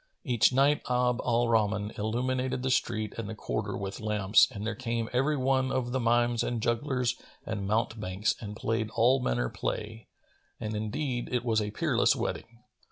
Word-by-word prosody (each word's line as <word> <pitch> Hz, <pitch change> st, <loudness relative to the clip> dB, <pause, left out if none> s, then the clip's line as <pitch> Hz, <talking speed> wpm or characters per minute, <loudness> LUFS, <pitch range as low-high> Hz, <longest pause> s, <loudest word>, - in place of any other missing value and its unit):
Each 125 Hz, -, +3 dB
night 140 Hz, +3 st, +3 dB
Abd 125 Hz, 0 st, +2 dB
al 120 Hz, 0 st, +2 dB
Rahman 105 Hz, -2 st, +1 dB
illuminated 125 Hz, +4 st, -1 dB
the 130 Hz, -, 0 dB
street 110 Hz, -3 st, 0 dB
and 110 Hz, -2 st, -4 dB
the 110 Hz, -, -5 dB
quarter 105 Hz, -2 st, -3 dB
with 100 Hz, 0 st, -5 dB
lamps 105 Hz, -2 st, +4 dB
and 105 Hz, 0 st, -6 dB
there 115 Hz, -, -1 dB
came 115 Hz, -1 st, -3 dB
every 140 Hz, +4 st, +2 dB
one 130 Hz, 0 st, +1 dB
of 125 Hz, -2 st, -1 dB
the 130 Hz, -, 0 dB
mimes 120 Hz, 0 st, +2 dB
and 120 Hz, -1 st, -1 dB
jugglers 125 Hz, +2 st, 0 dB, 0.3 s
and 100 Hz, -3 st, -3 dB
mountebanks 110 Hz, -2 st, 0 dB
and 105 Hz, -1 st, -6 dB
played 110 Hz, 0 st, -1 dB
all 125 Hz, +4 st, +4 dB
manner -, -, 0 dB
play; 110 Hz, -, -4 dB, 0.5 s
and 110 Hz, 0 st, -3 dB
indeed 120 Hz, +4 st, -2 dB
it 125 Hz, -1 st, -1 dB
was 110 Hz, -2 st, +2 dB
a 105 Hz, -, -2 dB
peerless 105 Hz, -, +2 dB
wedding. 115 Hz, 0 st, -5 dB
115 Hz, 170 wpm, -29 LUFS, 105-125 Hz, 0.5 s, lamps